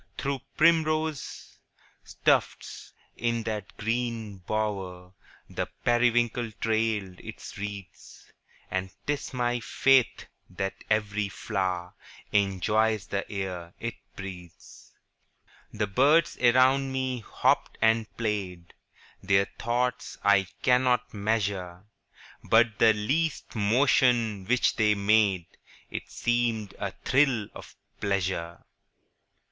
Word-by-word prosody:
Through 135 -1 -2 0.2
primrose 155 -2 +1 0.7
tufts, - - +1 0.2
in 115 0 -1
that 105 -4 -5
green 115 -2 -2
bower, 95 -2 -3 0.3
The - - -3 0.2
periwinkle 120 -1 +2
trailed 110 -4 -1
its - - -9
wreaths; 100 -1 -8 0.5
10 95 - +1
And 95 0 -8
'tis 145 0 -2
my 120 -1 0
faith 130 +2 +2 0.2
that 95 +2 -3 0.2
every 105 -1 0
flower 95 -3 -3 0.4
Enjoys 105 +1 +1
the 100 0 -4
air 90 -4 -5
it 115 -1 -3 0.2
breathes. 90 -3 -10 0.8
The 105 -1 -1
birds 145 +10 +3
around 130 +2 +4
me 130 -1 -2
hopped 110 - 0
and 110 0 +3
played, 95 -6 -3 0.5
Their 95 0 +3
thoughts 125 +1 -1
I 95 -2 +4 0.2
cannot 125 -1 +2
measure:– 100 -4 -2 0.6
But 115 0 +3
the 110 -1 +6
least 140 +10 -1
motion 115 -2 +3
which 125 +4 +2
they 105 -2 +3
made 100 -3 +3 0.5
It - - -6
seemed 120 -4 -1
a - - -2 0.2
thrill 130 -6 +2
of - - -12 0.2
pleasure. 95 -4 -2
110 Hz, 100 wpm, -27 LUFS, 100-125 Hz, 0.8 s, the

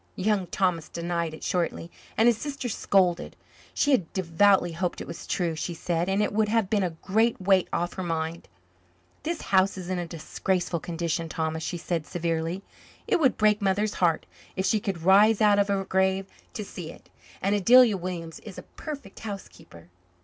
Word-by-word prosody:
Young 195 -1 0
Thomas 180 -3 0
denied 170 -1 -2
it - - -13
shortly, 170 -1 -2 0.3
and 225 - +4
his 240 - +5
sister 280 -3 -4
scolded. 185 -5 +1 0.4
She 290 - +1
had 195 - +2
devoutly 190 0 +3
hoped 175 +2 -2
it - - -6
was - - -8
true, 175 -3 0
she 170 +2 -4
said, 170 +1 -1
and 195 +2 +2
it 210 - -1
would 215 0 +2
have 220 -3 +1
been 210 -2 +3
a 185 - +1
great 220 +4 +2
weight 190 -1 +3
off 175 +1 -1
her 185 - -5
mind. 165 -1 -3 0.7
"This 335 0 -3
house 190 +1 +4
is 185 0 -5
in 185 - -1
a 175 - -4
disgraceful 170 +2 -2
condition, 165 0 -3
Thomas," 160 0 -2
she 175 +2 -3
said 165 -2 -3
severely. 170 +1 -2 0.4
"It - - +2
would 270 -5 +3
break 210 0 +3
Mother's 200 +2 +1
heart 170 -3 +2 0.3
if 190 - -1
she 210 +3 +2
could 190 -5 -4
rise 200 +4 +6
out 205 -2 +5
of 200 - +3
her 195 -1 0
grave 190 0 +1 0.3
to 210 - -4
see 170 -4 -7
it. - - -17 0.3
And 195 +2 0
Adelia 230 +2 +6
Williams 175 -3 -5
is 205 -4 -11
a - - -7
perfect 280 -10 -9
housekeeper." 195 - -9
185 Hz, 185 wpm, -26 LUFS, 170-205 Hz, 0.7 s, rise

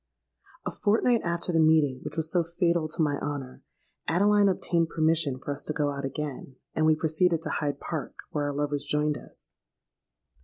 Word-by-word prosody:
A - - -2
fortnight 225 +3 +2
after 170 +1 -1
the 165 - +3
meeting 155 -4 +4
which - - -6
was 160 0 +1
so 175 -2 +3
fatal 170 -1 0
to 160 +1 0
my 145 -2 0
honour, 140 -3 -5 0.5
Adeline 200 +4 +4
obtained 170 -3 0
permission 160 -4 +2
for 140 - -5
us 140 - -3
to 155 - -2
go 150 -1 0
out 140 -1 -4
again; 135 -1 -5 0.2
and 155 0 +2
we 155 - +5
proceeded 160 +1 +1
to - - -2
Hyde 145 -2 -2
Park, 160 -4 -5 0.2
where 145 -1 -1
our 145 -1 -2
lovers 145 0 -1
joined 150 +1 +1
us. - - -11
155 Hz, 185 wpm, -27 LUFS, 145-170 Hz, 0.5 s, we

